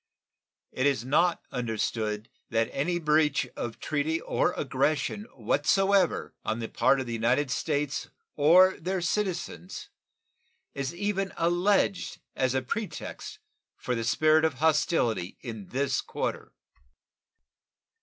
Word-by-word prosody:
It 130 Hz, +2 st, +1 dB
is 130 Hz, -5 st, 0 dB
not 170 Hz, +6 st, +2 dB
understood 110 Hz, -3 st, -2 dB, 0.2 s
that 115 Hz, 0 st, 0 dB
any 175 Hz, +6 st, 0 dB
breach 155 Hz, -3 st, +2 dB
of 115 Hz, -, -5 dB
treaty 155 Hz, +2 st, -1 dB
or 175 Hz, -, 0 dB
aggression 145 Hz, +8 st, -1 dB
whatsoever 190 Hz, -, +1 dB
on 110 Hz, -, -1 dB
the 115 Hz, -1 st, -4 dB
part 130 Hz, +3 st, +3 dB
of 130 Hz, -, -3 dB
the 120 Hz, -, -5 dB
United 125 Hz, +5 st, +1 dB
States 145 Hz, -1 st, -1 dB, 0.3 s
or 180 Hz, +6 st, +6 dB
their 185 Hz, +2 st, -2 dB
citizens 180 Hz, -1 st, -3 dB, 0.8 s
is 140 Hz, -1 st, -3 dB
even 195 Hz, 0 st, -1 dB
alleged 180 Hz, +3 st, +1 dB, 0.2 s
as 130 Hz, 0 st, +1 dB
a 130 Hz, -, 0 dB
pretext 215 Hz, -, -5 dB, 0.4 s
for 125 Hz, -, -3 dB
the 115 Hz, -1 st, -1 dB
spirit 155 Hz, +6 st, +3 dB
of 160 Hz, -4 st, +1 dB
hostility 145 Hz, -, +1 dB
in 110 Hz, -6 st, -7 dB
this 140 Hz, +2 st, 0 dB
quarter. -, -, -4 dB
145 Hz, 120 wpm, -28 LUFS, 125-175 Hz, 0.8 s, or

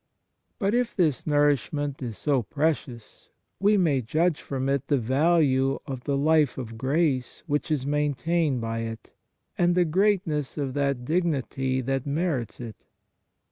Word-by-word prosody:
But 200 Hz, -1 st, 0 dB
if 245 Hz, -1 st, 0 dB
this 160 Hz, -7 st, +1 dB
nourishment 145 Hz, -1 st, +1 dB
is 115 Hz, -4 st, -5 dB
so 140 Hz, -4 st, +1 dB
precious, 140 Hz, -4 st, -3 dB, 0.3 s
we 205 Hz, +2 st, +4 dB
may 155 Hz, -8 st, +2 dB
judge 155 Hz, +7 st, 0 dB
from 135 Hz, -1 st, -3 dB
it 140 Hz, 0 st, 0 dB
the 145 Hz, -, +2 dB
value 135 Hz, +1 st, +2 dB
of 130 Hz, -4 st, -6 dB
the 140 Hz, -1 st, 0 dB
life 150 Hz, -1 st, +3 dB
of 115 Hz, -3 st, -6 dB
grace 135 Hz, +1 st, 0 dB
which 150 Hz, 0 st, -1 dB
is 145 Hz, -4 st, 0 dB
maintained 150 Hz, 0 st, 0 dB
by 115 Hz, 0 st, -3 dB
it, 115 Hz, 0 st, -6 dB, 0.5 s
and 175 Hz, 0 st, +3 dB
the 180 Hz, -1 st, +4 dB
greatness 170 Hz, -5 st, 0 dB
of 140 Hz, -3 st, -2 dB
that 140 Hz, -3 st, -1 dB
dignity 135 Hz, -5 st, 0 dB
that 135 Hz, +2 st, -2 dB
merits 140 Hz, -, -2 dB
it. 115 Hz, -3 st, -9 dB
145 Hz, 145 wpm, -26 LUFS, 130-160 Hz, 0.5 s, we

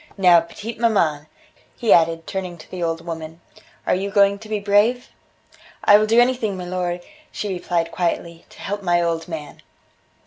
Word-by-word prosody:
Now, 180 Hz, -3 st, +6 dB
petite 215 Hz, +7 st, -8 dB
maman," 165 Hz, -11 st, +1 dB, 0.5 s
he 235 Hz, -, +4 dB
added, 165 Hz, -1 st, +3 dB
turning 185 Hz, -3 st, -5 dB
to 155 Hz, -, -15 dB
the 185 Hz, -, -6 dB
old 165 Hz, 0 st, -2 dB
woman, 165 Hz, -1 st, -7 dB, 0.5 s
"are -, -, +2 dB
you 195 Hz, +2 st, -1 dB
going 200 Hz, 0 st, +3 dB
to 220 Hz, 0 st, -12 dB
be 215 Hz, -, 0 dB
brave?" 205 Hz, +5 st, +2 dB, 0.7 s
"I 205 Hz, 0 st, +7 dB
will 215 Hz, -, +1 dB
do 225 Hz, +2 st, +4 dB
anything, 240 Hz, -5 st, +1 dB
milor," 180 Hz, -1 st, -3 dB, 0.3 s
she 210 Hz, -, -4 dB
replied 170 Hz, -2 st, -2 dB
quietly, 170 Hz, -1 st, -3 dB
"to -, -, -15 dB
help 205 Hz, +1 st, -4 dB
my 175 Hz, -2 st, +2 dB
old 170 Hz, 0 st, -1 dB
man." 155 Hz, -4 st, -8 dB
180 Hz, 170 wpm, -21 LUFS, 170-205 Hz, 0.7 s, I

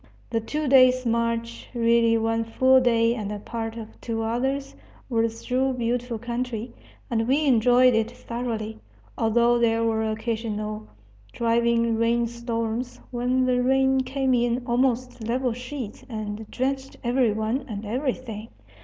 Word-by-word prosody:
The 225 Hz, -1 st, 0 dB
two 300 Hz, +6 st, -3 dB
days' 255 Hz, -1 st, +5 dB
march 230 Hz, 0 st, -1 dB
really 230 Hz, -1 st, +4 dB
one 225 Hz, 0 st, 0 dB
full 260 Hz, +3 st, +4 dB
day 230 Hz, -2 st, +3 dB
and 215 Hz, -4 st, -4 dB, 0.2 s
part 225 Hz, -1 st, -4 dB
of 220 Hz, -1 st, -10 dB
two 225 Hz, -1 st, -2 dB
others 265 Hz, +5 st, -2 dB, 0.3 s
was 225 Hz, -1 st, -1 dB
through 260 Hz, +1 st, +1 dB
beautiful 240 Hz, 0 st, -2 dB
country, 240 Hz, 0 st, -4 dB, 0.4 s
and 225 Hz, -1 st, +1 dB
we 285 Hz, +4 st, +2 dB
enjoyed 250 Hz, 0 st, +5 dB
it 225 Hz, 0 st, +1 dB
thoroughly, 235 Hz, -3 st, -5 dB, 0.4 s
although 235 Hz, +2 st, +3 dB
there 230 Hz, -1 st, +2 dB
were 220 Hz, -1 st, +1 dB
occasional 215 Hz, -1 st, -3 dB, 0.5 s
driving 235 Hz, 0 st, +2 dB
rain 235 Hz, +1 st, +2 dB
storms, 235 Hz, +1 st, -3 dB
when 250 Hz, +1 st, +1 dB
the 250 Hz, -1 st, +2 dB
rain 265 Hz, +1 st, +3 dB
came 265 Hz, 0 st, 0 dB
in 240 Hz, 0 st, +1 dB
almost 250 Hz, -1 st, 0 dB
level 250 Hz, 0 st, 0 dB
sheets 250 Hz, -2 st, -7 dB
and 215 Hz, -1 st, -5 dB
drenched 270 Hz, +1 st, -2 dB
every 245 Hz, -1 st, +2 dB
one 220 Hz, +5 st, -1 dB
and 210 Hz, 0 st, -5 dB
everything. 240 Hz, -2 st, -3 dB
235 Hz, 135 wpm, -25 LUFS, 225-255 Hz, 0.5 s, days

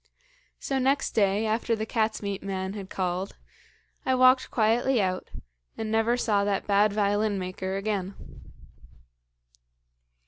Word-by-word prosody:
"So 270 Hz, -1 st, -1 dB
next 270 Hz, +2 st, +1 dB
day, 205 Hz, 0 st, +2 dB
after 225 Hz, +1 st, 0 dB
the 220 Hz, 0 st, -3 dB
cat's 220 Hz, -1 st, -1 dB
meat 200 Hz, -1 st, -3 dB
man 190 Hz, -1 st, -3 dB
had 195 Hz, -2 st, -7 dB
called, 185 Hz, +1 st, -3 dB, 0.7 s
I 260 Hz, -, +2 dB
walked 255 Hz, +1 st, +5 dB
quietly 235 Hz, +3 st, +2 dB
out, 185 Hz, -2 st, -1 dB, 0.5 s
and 220 Hz, -1 st, -3 dB
never 225 Hz, +2 st, +2 dB
saw 210 Hz, -5 st, +1 dB
that 200 Hz, -1 st, -1 dB
bad 205 Hz, +1 st, +3 dB
violin 205 Hz, 0 st, +1 dB
maker 190 Hz, +1 st, -4 dB
again. 195 Hz, -2 st, -2 dB
210 Hz, 130 wpm, -27 LUFS, 195-225 Hz, 0.7 s, walked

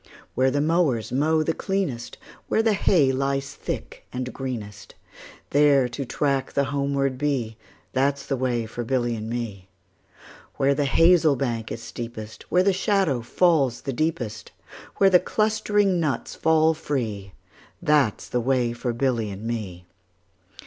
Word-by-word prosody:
Where 130 Hz, +1 st, +3 dB
the 145 Hz, +2 st, 0 dB
mowers 150 Hz, -, +1 dB
mow 155 Hz, +4 st, +2 dB
the 165 Hz, -, 0 dB
cleanest, 160 Hz, -14 st, -3 dB, 0.3 s
Where 220 Hz, -, +2 dB
the 225 Hz, -2 st, +3 dB
hay 170 Hz, -8 st, +3 dB
lies 135 Hz, +1 st, -1 dB
thick -, -, -6 dB
and 125 Hz, 0 st, -4 dB
greenest, 105 Hz, -7 st, -6 dB, 0.6 s
10 145 Hz, -, +3 dB
There 140 Hz, -4 st, +4 dB
to 135 Hz, +3 st, -5 dB
track 135 Hz, 0 st, -1 dB
the 140 Hz, -, +2 dB
homeward 140 Hz, -1 st, -1 dB
bee, 135 Hz, -7 st, -1 dB, 0.4 s
That 135 Hz, +2 st, +2 dB
's 140 Hz, -, -10 dB
the 135 Hz, -, -1 dB
way 125 Hz, -3 st, -1 dB
for 120 Hz, +2 st, -5 dB
Billy 120 Hz, -1 st, 0 dB
and 110 Hz, 0 st, -5 dB
me. 110 Hz, -6 st, -5 dB, 0.9 s
Where 135 Hz, +1 st, +3 dB
the 145 Hz, +1 st, 0 dB
hazel 165 Hz, +1 st, +4 dB
bank 120 Hz, -4 st, -3 dB
is 115 Hz, +1 st, -6 dB
steepest, 115 Hz, -3 st, -8 dB
Where 180 Hz, -, +3 dB
the 200 Hz, 0 st, +3 dB
shadow 190 Hz, -, +1 dB
falls 135 Hz, -2 st, +2 dB
the 135 Hz, -, -4 dB
deepest, 125 Hz, -7 st, -3 dB, 0.5 s
Where 195 Hz, -1 st, +5 dB
the 180 Hz, -, +7 dB
clustering 205 Hz, -2 st, +1 dB
nuts 145 Hz, -7 st, -2 dB
fall 160 Hz, 0 st, +3 dB
free, 110 Hz, -11 st, -4 dB, 0.5 s
15 -, -, -18 dB
That 145 Hz, -8 st, +3 dB
's -, -, -11 dB
the 125 Hz, -, 0 dB
way 125 Hz, -1 st, +1 dB
for 120 Hz, 0 st, -3 dB
Billy 120 Hz, -3 st, 0 dB
and 100 Hz, +1 st, -8 dB
me. 105 Hz, -7 st, -5 dB
135 Hz, 160 wpm, -24 LUFS, 120-155 Hz, 0.9 s, the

